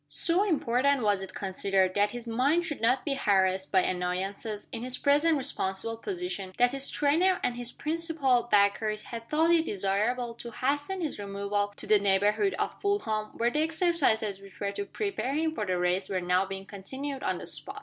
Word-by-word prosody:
So 350 +3 +2
important 280 - +1
was 205 -2 +2
it 190 -1 -8
considered 190 -1 0
that 205 +1 +2
his 240 +1 -7
mind 270 +9 +1
should 300 -6 -3
not 250 +3 +2
be 290 - 0
harassed 190 -6 +1
by 190 - +5
annoyances, 190 +4 -2
in 230 -3 -5
his 250 +1 -1
present 295 +3 +3
responsible 225 -3 -1
position, 345 - -4
that 245 0 +4
his 275 0 -1
trainer 335 +6 +2
and 245 - 0
his 245 0 -4
principal 305 -6 0
backers 210 +1 +2
had 230 -1 -8
thought 320 +2 +3
it 330 -1 +4
desirable 215 +4 0
to 235 0 -8
hasten 290 - -2
his 310 -9 -3
removal 200 0 -2
to - - -7
the 215 - +5
neighborhood 205 - +2
of - - -3
Fulham 225 - 0
where 235 +1 +1
the 300 - +1
exercises 315 - +1
which 195 -1 -15
were 200 -1 -1
to 200 0 -4
prepare 380 - -3
him 315 +1 0
for 215 -9 -3
the 185 -1 0
race 180 +2 0
were 190 -2 0
now 180 +2 +1
being 195 0 -6
continued 265 +8 -6
on - - -1
the - - -8
spot. 400 +1 -2
230 Hz, 190 wpm, -28 LUFS, 200-290 Hz, -, by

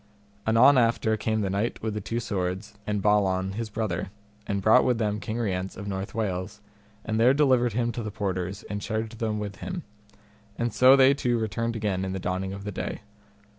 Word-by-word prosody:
Anon 130 +5 +6
after 115 -2 +2
came 110 0 -1
the 100 - -1
Knight 105 +4 -2
with 110 -1 -1
the 105 - -3
Two 115 - -3
Swords 100 -1 -3
and 105 -2 -1
Balan 95 -3 +2
his 110 +2 -4
brother, 100 -5 -2 0.4
and 100 -1 -1
brought 110 +6 +5
with 125 -2 +2
them 105 -2 -1
King 110 +2 -4
Rience 95 -5 -2
of 100 - -6
North 95 0 -4
Wales, 100 -1 -3 0.5
and 110 0 -1
there 125 +4 +5
delivered 130 -5 +3
him 120 +1 0
to 120 - -5
the 110 - -4
porters, 95 -1 -3
and 105 0 -5
charged 110 +1 -3
them 110 -2 -1
with 100 -1 -5
him; 185 - -5 0.7
and 120 0 -1
so 130 +1 +7
they 135 0 +6
two 125 -4 0
returned 115 +1 -2
again 100 -4 -1
in 95 0 -3
the 95 - -3
dawning 95 +1 -2
of 100 0 -7
the 105 - -4
day. 95 - -4
110 Hz, 205 wpm, -26 LUFS, 95-115 Hz, 0.7 s, so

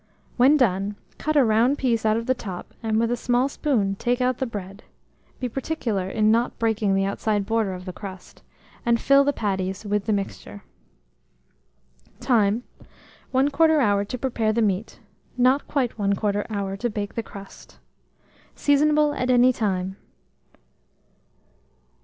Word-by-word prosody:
When 265 +5 +5
done, 200 -5 +1 0.2
cut 310 0 -1
a 280 - +6
round 230 +5 +3
piece 230 -5 0
out 215 +1 +3
of 230 - -3
the 260 - +2
top, 195 -7 -8
and, 220 -1 0
with 230 +1 +1
a - - +2
small 245 +2 +1
spoon, 250 -9 0
take 245 +3 0
out 250 0 0
the 265 - -1
bread 200 -2 -7 0.6
(be 255 - -2
particular 230 -7 -3
in 215 +1 +2
not 235 +2 +1
breaking 220 -3 +1
the 195 0 +1
outside 205 +1 -1
border 220 -3 0
of 180 0 -9
the 185 - -6
crust), 190 -2 -10 0.4
and 235 -1 +2
fill 275 0 +5
the 285 - +2
patties 190 -4 -3
with 205 -1 -1
the 220 - 0
mixture. 200 0 -4 1.6
Time. 235 -3 +2 0.7
1/4 290 +4 +3
hour 205 -6 +2
to 250 +5 -5
prepare 230 -4 0
the 230 +1 +1
meat; 200 +1 -2 0.4
not 255 +3 +3
quite 265 -5 -1
1/4 205 0 0
hour 200 -2 -3
to 235 +5 -2
bake 205 -2 -4
the 230 - -2
crust. 200 -3 -13 0.8
Seasonable 295 +1 +3
at 255 -3 -2
any 250 0 +5
time. 190 -4 -2
225 Hz, 150 wpm, -24 LUFS, 200-255 Hz, 1.6 s, a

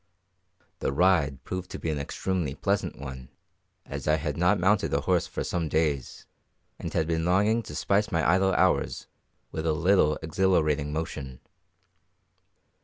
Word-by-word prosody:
The - - -1
ride 75 -3 +2
proved 90 -1 -5
an 75 -3 -1
extremely 80 0 -2
pleasant 100 -1 -1
one, 65 -3 -8 0.6
as - - -6
I 75 - +4
had 75 -1 -3
not 90 +4 +2
mounted 100 +3 +2
a - - +1
horse - - +1
for - - -4
some 85 -3 -2
days, 75 -5 -1 0.5
and - - -5
had 80 - +1
been 80 0 -1
longing 100 +6 +3
to 75 -9 -9
spice 100 +7 +1
my 80 -2 +1
idle 95 +3 +3
hours - - +1 0.5
with 80 +1 -3
a 80 - +3
little 85 -2 +3
exhilarating 80 -4 +1
motion. 75 -5 -5
80 Hz, 145 wpm, -27 LUFS, 75-95 Hz, 0.6 s, I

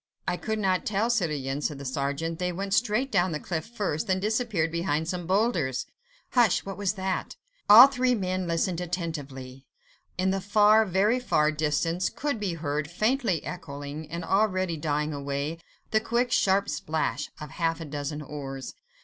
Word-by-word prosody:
"I - - +1
could 220 +4 -3
not 190 -3 +1
tell, 215 +3 +1
citoyen," 150 - -1
said 150 -1 -2
the 140 - -8
sergeant; 140 +5 -2
"they 180 0 0
went 195 +2 -3
straight 245 +5 +1
down 180 -3 +2
the 150 - -2
cliff 160 -2 -4
first, 205 -9 -2
then 190 -1 +1
disappeared 210 -6 0
behind 160 -2 -1
some 175 -1 -3
boulders." 185 - +1 0.5
"Hush! 240 -6 +3
what 195 -1 -5
was 200 -1 -1
that?" 190 -2 -3 0.3
All 225 +5 +12
three 255 -2 +1
men 185 -3 -2
listened 170 +1 0
attentively. 145 -7 -5 0.5
In 185 +1 +2
the 195 0 -1
far, 210 +2 +5
very 200 +7 +2
far 155 -11 +2
distance, 160 +3 0
could 285 -5 -3
be 195 -5 -2
heard 150 -2 -2
faintly 215 - 0
echoing 150 -2 -7
and 170 +1 -5
already 185 -3 +1
dying 150 0 -1
away, 140 +3 -3 0.3
the 220 - +4
quick, 235 +2 0
sharp 195 +1 +3
splash 150 -1 -2
of 150 -2 -8
half 165 -1 -1
a 165 - -6
dozen 150 +1 -4
oars. 135 -2 -6
175 Hz, 165 wpm, -27 LUFS, 150-205 Hz, 0.5 s, All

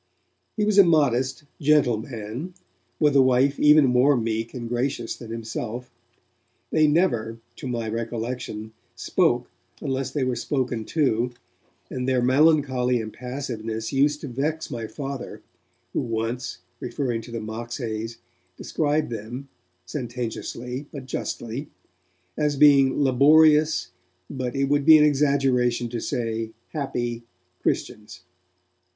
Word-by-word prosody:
He 210 - +2
was 210 -1 +4
a - - +11
modest, 135 -6 +2 0.2
gentle 145 -6 +4
man, 120 - -6 0.4
with 150 -2 +3
a 135 - +7
wife 130 +2 +3
even 150 0 +7
more 130 +2 +4
meek 115 0 -2
and 120 -2 -6
gracious 120 0 -2
than 115 - -11
himself. 115 +2 -5 0.8
They 155 -1 +4
never, 120 -9 +1 0.2
to - - -6
my 120 -2 -2
recollection, 115 -1 -4 0.2
spoke - - +1 0.3
unless 135 -1 -2
they 135 0 -1
were 130 -1 0
spoken 120 -2 -2
to, 125 -5 +1 0.6
and 125 0 -2
their 130 -1 +2
melancholy 130 -2 +3
impassiveness 115 -1 -5
used 145 +2 +2
to - - -5
vex 150 +5 -2
my 115 -3 -4
Father, 135 +1 -6 0.5
who - - 0
once, 115 +2 -3 0.2
referring 120 -5 -2
to 115 - -12
the 115 - -4
Moxhays, 115 0 -5 0.4
described 150 -3 -1
them, 120 +5 -6 0.4
sententiously 125 +3 -5
but 140 -3 -8
justly, 130 +1 -4 0.7
as 150 -1 0
being 140 -1 +5
'laborious, 150 - +5 0.4
but 130 -2 -4
it 135 - +1
would 145 +1 +2
be 160 +1 +9
an 150 - +5
exaggeration 135 -5 +2
to 120 0 -3
say 115 -1 -3 0.2
happy, 120 -6 -3 0.4
Christians'. 105 -3 -3
125 Hz, 125 wpm, -24 LUFS, 115-145 Hz, 0.8 s, a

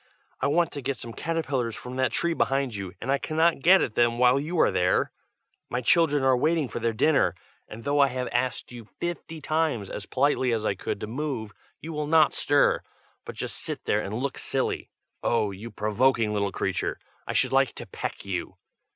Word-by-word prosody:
I - - +1
want 170 +3 +2
to 145 - -5
get 135 +1 -2
some 115 - -8
caterpillars 135 -9 -2
from 125 +1 -8
that 130 0 +1
tree 170 0 +1
behind 135 -5 0
you, 100 -3 -5
and 130 - -2
I 140 - +2
cannot 160 +1 +2
get 185 +5 +6
at 110 - -3
them 120 0 +2
while 125 +2 +5
you 160 +4 -2
are - - +5
there. 90 0 +2 0.6
My 125 - -1
children 145 +2 +3
are 130 -1 +5
waiting 155 +3 +1
for - - -5
their 115 0 +1
dinner, 145 +7 +2 0.3
and 115 +2 -10
though 145 +1 +1
I 140 - +6
have 125 -1 -3
asked 125 +1 -1
you 120 -2 -9
fifty 170 -2 -4
times, 155 -11 0
as 105 - -6
politely 130 -2 +2
as 110 -1 -1
I - - +2
could, 95 - -4
to - - -2
move, 120 -2 -4 0.3
you 165 +1 -6
will 150 -1 -2
not 155 -2 +5
stir, 145 0 +3 0.4
but - - -7
just - - -4
sit - - -5
there 105 - +2
and 105 +1 -4
look 130 +3 -3
silly. - - -2 0.3
Oh! 110 -3 +1
you 100 +5 -8
provoking 110 +1 +1
little 100 -1 0
creature! - - -2 0.3
I - - -2
should - - +2
like - - +3
to - - -7
peck - - -6
you!" - - -4
130 Hz, 205 wpm, -26 LUFS, 115-150 Hz, 0.6 s, get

